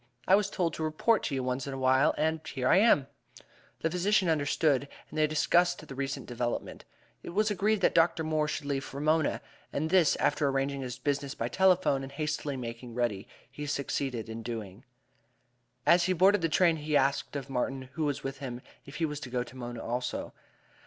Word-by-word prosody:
I 185 - +5
was 205 0 +4
told 170 -5 -1
to 160 - -4
report 160 +9 +2
to 140 - -2
you 130 - -1
once 125 +1 -2
in 135 - -4
a - - -5
while 130 +1 +3
and 160 0 0
here 130 -1 -2
I - - +6
am." 195 - +5 0.8
The 160 - 0
physician 185 +1 +2
understood, 145 -2 +2
and - - -21 0.2
then - - -7
they 155 0 +4
discussed 175 +2 +2
the - - -8
recent 135 -1 -4
development. 120 -1 -4 0.4
It - - -8
was 215 +1 +2
agreed 210 +1 +1
that - - +3
Dr. 165 0 +3
Moore 155 -1 0
should 145 - -3
leave 140 -1 -1
for 135 0 -7
Mona; 155 +1 +1 0.3
and 160 +3 -2
this, 185 -4 +5
after 145 - +1
arranging 135 0 -1
his 125 -1 -5
business 140 +1 -2
by 115 - -2
telephone 185 -4 +3
and 135 0 -7
hastily 150 -1 -2
making 115 -1 -7
ready, 115 -5 -1 0.2
he 150 +2 -6
succeeded 135 -4 -2
in 115 0 -6
doing. 110 -1 -6 1.0
As 175 0 +5
he 185 - +2
boarded 190 +3 +4
the 165 - +1
train 165 0 +3
he 150 -1 +1
asked 140 +1 0
of 140 -2 -4
Martin, 135 0 -2
who 160 - -1
was 145 -2 -2
with 135 0 -5
him, 125 -3 -6 0.3
if 140 - -10
he 165 - 0
was 150 -2 -4
to 130 - -8
go 125 0 -1
to 125 +1 -14
Mona 120 -2 -6
also. 125 +2 -3
140 Hz, 205 wpm, -29 LUFS, 130-160 Hz, 1.0 s, I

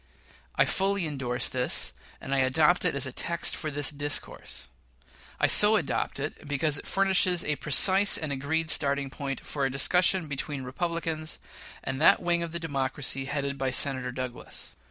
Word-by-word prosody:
I - - +3
fully 195 -1 0
indorse 130 -5 -2
this, 125 - -1 0.3
and 135 - -5
I 135 - +2
adopt 150 +8 +2
it 170 - 0
as 140 - 0
a 130 - -4
text 170 +6 0
for 155 - -5
this 145 0 -2
discourse. 145 0 -5 0.7
I - - +3
so 210 +1 +8
adopt 155 -6 -2
it 145 +1 -6
because 145 +1 0
it - - -11
furnishes 190 -2 +2
a 150 - -1
precise 190 +7 +5
and 155 -2 -4
an 135 - -3
agreed 160 +4 -1
starting 140 -1 +1
point 135 -2 -6
for 140 - -4
a 135 - +1
discussion 180 +6 +2
between 140 -1 -5
Republicans 160 +3 -3 0.5
and 135 +1 -4
that - - +6
wing 175 -1 0
of 170 -1 -5
the 170 - -4
Democracy 135 -3 -2
headed 140 0 -3
by 135 0 -1
Senator 130 -1 0
Douglas. 125 -1 -6
145 Hz, 175 wpm, -27 LUFS, 135-170 Hz, 0.7 s, so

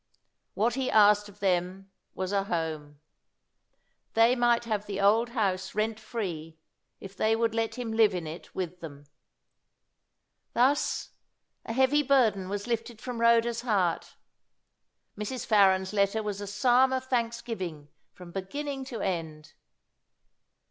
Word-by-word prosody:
What 225 +3 +1
he 260 +1 -1
asked 210 -1 +5
of 205 0 -17
them 190 +1 -1 0.2
was 185 0 -3
a 200 -1 0
home. 155 -5 -4 1.2
They 230 +2 +5
might 240 -1 +2
have 210 -2 -2
the 200 -1 -4
old 220 +4 +3
house 195 -6 -1
rent 215 +1 -1
free, 165 -9 -5 0.4
if 195 0 -10
they 220 +3 +2
would 225 0 0
let 225 0 -1
him 245 -3 -4
live 220 -3 +4
in 175 -2 -4
it 160 +3 -9
with 180 -1 -4
them. 145 -4 -10 1.5
Thus, 265 +5 +1 0.6
a 225 - -3
heavy 265 +4 +3
burden 235 -9 +2
was 205 0 -3
lifted 230 -1 -3
from 245 -1 -5
Rhoda's 235 0 +3
heart. 200 -8 0 1.0
Mrs. 215 +4 -5
Farren's 190 -2 +3
letter 200 +2 +1
was 205 -1 -4
a 205 - -5
psalm 245 +6 +3
of 260 0 -1
thanksgiving 230 - -3 0.2
from 180 -1 -13
beginning 270 +9 -5
to 250 -4 -6
end. 160 -4 -4
210 Hz, 135 wpm, -28 LUFS, 190-235 Hz, 1.5 s, asked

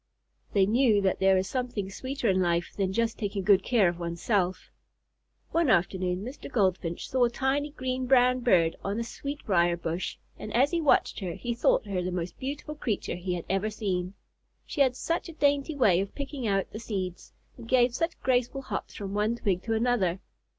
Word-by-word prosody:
They 195 -2 +4
knew 225 0 +3
that 190 -1 +1
there 190 0 +4
is 185 0 0
something 240 -6 -3
sweeter 260 +3 -3
in 190 -1 +3
life 175 -1 0
than 195 -2 0
just 230 +3 -1
taking 200 -2 -2
good 200 0 +5
care 220 -3 +3
of 175 0 -2
one's 170 0 -4
self. 185 -4 0 0.8
One 330 -4 +2
afternoon 180 -1 +1
Mr. 255 +4 -8
Goldfinch 185 -7 0
saw 255 -1 +3
a - - +1
tiny 275 +4 0
green 255 -3 -3
brown 250 -1 +5
bird 175 -9 +3
on 200 +3 -2
a - - -1
sweetbriar 195 -10 0
bush, 170 +1 -3 0.2
and 215 - -6
as 270 +4 +4
he 340 -1 0
watched 300 - +3
her 185 -4 -4
he 240 -1 -3
thought 230 - +2
her 195 -3 -2
the 180 +1 -2
most 175 -1 -4
beautiful 290 +3 -5
creature 230 -8 -2
he 180 0 -3
had 170 - -6
ever 195 +3 0
seen. 190 -3 -3 0.5
She 290 - -2
had 260 -2 +4
such 335 +5 -2
a - - -8
dainty 285 0 +1
way 200 -10 +4
of 200 - -6
picking 275 -4 -4
out 195 -2 0
the 215 - -6
seeds, 190 -6 -5 0.2
and 230 -2 -12
gave 245 -1 +4
such 330 +6 -2
graceful 255 +1 0
hops - - -5
from 200 -1 -5
one 210 +3 +1
twig 195 -6 -1
to 225 - 0
another. 220 -6 +1
215 Hz, 200 wpm, -28 LUFS, 185-255 Hz, 0.8 s, good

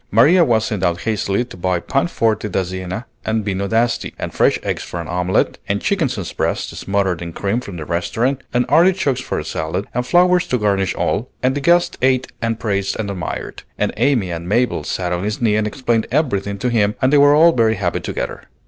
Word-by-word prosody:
Maria 155 - +5
was 115 -7 +2
sent 105 -4 -3
out 85 -2 0
hastily 110 0 0
to 120 - -12
buy 90 0 0
pan 135 - 0
forte 110 -8 0
da 95 0 0
Siena 95 +5 -5 0.2
and 110 -1 -1
vino 100 -1 -1
d'Asti, 115 +3 0
and - - -5
fresh - - +3
eggs - - -2
for 85 - -6
an 85 - -5
omelette, 90 +1 0
and 100 0 +1
chickens' 135 - -1
breasts - - -2
smothered 95 -3 -1
in 85 -1 -5
cream 100 +7 -1
from 100 -7 -8
the 80 - -6
restaurant, 115 - -1
and 125 0 +1
artichokes 155 -4 +3
for - - -3
a - - -3
salad, 80 +5 -3
and 125 +1 -2
flowers 180 0 +4
to 125 - +1
garnish 100 -4 0
all; 125 - -1
and 130 +1 +3
the 145 - -3
guest 175 +4 +2
ate 130 0 +2
and 115 -1 -1
praised 100 -3 -1
and 100 -2 -2
admired; 90 -3 -5 0.2
and - - 0
Amy 120 -11 +1
and 85 +1 -5
Mabel 120 -7 +1
sat 90 +3 -2
on 90 +1 -2
his 105 +1 -2
knee 110 -3 +2
and 105 0 +1
explained 115 -1 -1
everything 100 -8 0
to 125 +5 -1
him, 105 -3 +2
and 130 +2 +2
they 145 - +6
were 145 +1 +6
all 165 +3 +7
very 115 -5 +2
happy 90 -4 -1
together. - - -5
110 Hz, 215 wpm, -19 LUFS, 95-130 Hz, 0.2 s, all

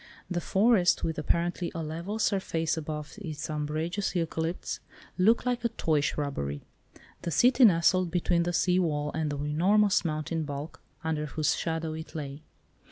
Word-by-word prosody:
The 175 -1 0
forest, 195 -1 +3
with 160 -1 -1
apparently 170 +2 0
a 165 - -2
level 170 +7 -4
surface 170 -7 0
above 150 -2 -5
its 155 -3 -5
umbrageous 155 +6 -2
eucalypts, 165 0 -2 0.4
looked 220 +7 +3
like 245 -1 0
a 235 - +2
toy 160 -9 +1
shrubbery. 135 - -2 0.6
The - - -3
city 245 - +5
nestled 180 -1 +4
between 175 0 +1
the 175 +1 0
sea 180 +1 +2
wall 150 -4 0
and 160 -1 -1
the 145 - -3
enormous 185 +8 +3
mountain 160 0 -2
bulk, 145 +1 -6 0.2
under 155 -1 -1
whose 155 0 0
shadow 160 -1 -2
it 160 +1 -8
lay. 145 -1 -5
165 Hz, 155 wpm, -28 LUFS, 150-185 Hz, 0.6 s, city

